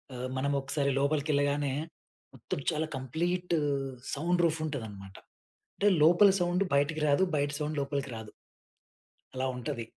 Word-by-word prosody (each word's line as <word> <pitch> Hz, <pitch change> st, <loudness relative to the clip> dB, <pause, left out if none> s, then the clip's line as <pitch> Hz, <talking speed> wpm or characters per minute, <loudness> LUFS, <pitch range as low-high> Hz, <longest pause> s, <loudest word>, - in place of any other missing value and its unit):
ఆహ్, 125 Hz, +1 st, -4 dB
మనం 140 Hz, +2 st, 0 dB
ఒకసారి 140 Hz, +1 st, 0 dB
లోపలికెళ్ళగానే 145 Hz, -1 st, +1 dB, 0.6 s
మొత్తం -, -, -5 dB
చాలా 155 Hz, +1 st, -1 dB
కంప్లీట్ 175 Hz, +7 st, -2 dB, 0.6 s
సౌండ్ 175 Hz, +4 st, +1 dB
రూఫ్ 165 Hz, -1 st, +2 dB
ఉంటదనమాట. 105 Hz, -9 st, -6 dB, 0.6 s
అంటే 205 Hz, -, +1 dB, 0.2 s
లోపల 175 Hz, +5 st, +7 dB
సౌండ్ 175 Hz, +2 st, +2 dB
బయటికి 150 Hz, +2 st, +2 dB
రాదు. 145 Hz, +6 st, +4 dB
బయట 145 Hz, 0 st, +1 dB
సౌండ్ 150 Hz, 0 st, -2 dB
లోపలికి 140 Hz, -1 st, -2 dB
రాదు. 110 Hz, -1 st, -8 dB, 1.0 s
అలా 130 Hz, +1 st, -2 dB
ఉంటది. 120 Hz, -1 st, -4 dB
145 Hz, 125 wpm, -30 LUFS, 135-160 Hz, 1.0 s, లోపల